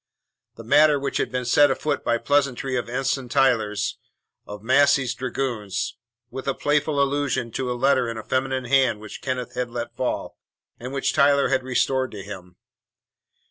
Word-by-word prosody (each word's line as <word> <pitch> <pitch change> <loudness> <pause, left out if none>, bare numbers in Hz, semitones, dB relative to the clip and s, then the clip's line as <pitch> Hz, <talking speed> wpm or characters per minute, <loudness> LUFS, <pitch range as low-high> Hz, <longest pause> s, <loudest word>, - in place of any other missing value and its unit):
The 115 - -10
matter 145 +4 +5 0.2
had - - -1
been 125 0 -2
set 145 +4 +5
afoot 145 +2 -1
by 120 - +1
a - - -2
pleasantry 135 -2 0
of 120 -1 -2
Ensign 130 0 -2
Tyler's, 115 -6 +1 0.5
of 105 0 -9
Massey's 140 +1 +3
dragoons, 125 -6 -3 0.4
with 130 - -7
a 135 - 0
playful 145 0 0
allusion 140 -4 0
to 125 +2 -3
a 120 - -3
letter 130 -1 +2
in 115 - -5
a 110 - -6
feminine 130 +1 -1
hand 130 -4 +2
which 110 -1 -10
Kenneth 125 -2 -3
had 125 -1 -3
let 120 0 -6
fall, 125 - -3 0.4
and 125 +2 -7
which 135 0 -1
Tyler 140 0 +4
had 130 -1 +2
restored 130 +1 0
to 100 -2 -7
him. 90 -3 -10
130 Hz, 170 wpm, -23 LUFS, 120-140 Hz, 0.5 s, matter